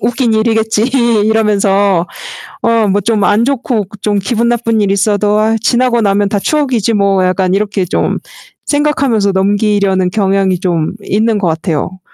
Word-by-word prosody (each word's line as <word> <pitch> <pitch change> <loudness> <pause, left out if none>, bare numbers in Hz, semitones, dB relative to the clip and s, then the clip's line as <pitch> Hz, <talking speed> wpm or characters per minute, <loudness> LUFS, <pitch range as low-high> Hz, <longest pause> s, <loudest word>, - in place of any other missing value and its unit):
웃긴 235 0 0
일이겠지.' 220 -1 +1 0.4
이러면서 200 -4 +1 0.6
어, 230 -2 +2
뭐 200 +1 +1
좀 215 0 0
안 210 +3 +2
좋고 245 -5 -1
그 210 - -13
좀 205 0 0
기분 235 +4 -1
나쁜 230 -2 0
일이 200 -1 +1
있어도 205 +1 +1
'아이, 220 +1 +1
지나고 240 +1 +1
나면 200 -1 +1
다 205 - 0
추억이지 250 -3 0
뭐.' 200 -2 +1
약간 185 0 0
이렇게 200 -1 -1
좀 180 - -1 0.5
생각하면서 280 -9 +1
넘기려는 200 -1 +1
경향이 195 -2 0
좀 170 -4 -1
있는 220 +3 0
것 190 -4 0
같아요. 165 +2 -3
210 Hz, 320 characters per minute, -13 LUFS, 195-225 Hz, 0.6 s, 어